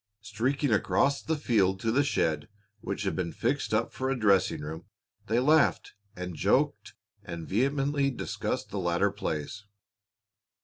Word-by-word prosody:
Streaking 130 Hz, +4 st, 0 dB
across 110 Hz, +7 st, +2 dB
the 160 Hz, -1 st, -1 dB
field 100 Hz, -9 st, +2 dB
to 115 Hz, -, +1 dB
the 140 Hz, +5 st, +3 dB
shed 80 Hz, -, 0 dB, 0.3 s
which 100 Hz, 0 st, -4 dB
had 95 Hz, -, -1 dB
been 90 Hz, -2 st, -2 dB
fixed 135 Hz, +5 st, -1 dB
up -, -, 0 dB
for 130 Hz, 0 st, -2 dB
a 135 Hz, -, 0 dB
dressing 100 Hz, -9 st, +3 dB
room, 80 Hz, +3 st, -7 dB, 0.4 s
they 115 Hz, +2 st, +2 dB
laughed, 150 Hz, +4 st, +3 dB, 0.2 s
and 90 Hz, 0 st, -5 dB
joked, -, -, +1 dB, 0.3 s
and 85 Hz, -1 st, -7 dB
vehemently 140 Hz, +5 st, +1 dB
discussed 130 Hz, -, -3 dB
the 100 Hz, -, -3 dB
latter 90 Hz, +2 st, +1 dB
plays. 80 Hz, +3 st, -4 dB
110 Hz, 145 wpm, -28 LUFS, 90-135 Hz, 0.4 s, the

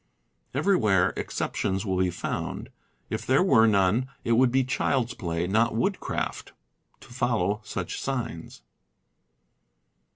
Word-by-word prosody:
Everywhere 100 Hz, -, +3 dB
exceptions 95 Hz, +2 st, -2 dB
will 95 Hz, -2 st, 0 dB
be 95 Hz, -1 st, +2 dB
found; 85 Hz, -, -4 dB, 0.4 s
if -, -, -2 dB
there 135 Hz, +7 st, +3 dB
were 115 Hz, -12 st, +5 dB
none, 105 Hz, +4 st, +2 dB, 0.2 s
it 115 Hz, -, -1 dB
would 120 Hz, +2 st, +4 dB
be 130 Hz, +1 st, +3 dB
child's 125 Hz, -1 st, 0 dB
play, 85 Hz, -5 st, -2 dB
not 110 Hz, +5 st, +2 dB
woodcraft, 195 Hz, -, -2 dB, 0.5 s
to 120 Hz, -, -14 dB
follow 110 Hz, -5 st, 0 dB
such -, -, -5 dB
signs. 120 Hz, -, -4 dB
115 Hz, 120 wpm, -26 LUFS, 95-130 Hz, 0.5 s, were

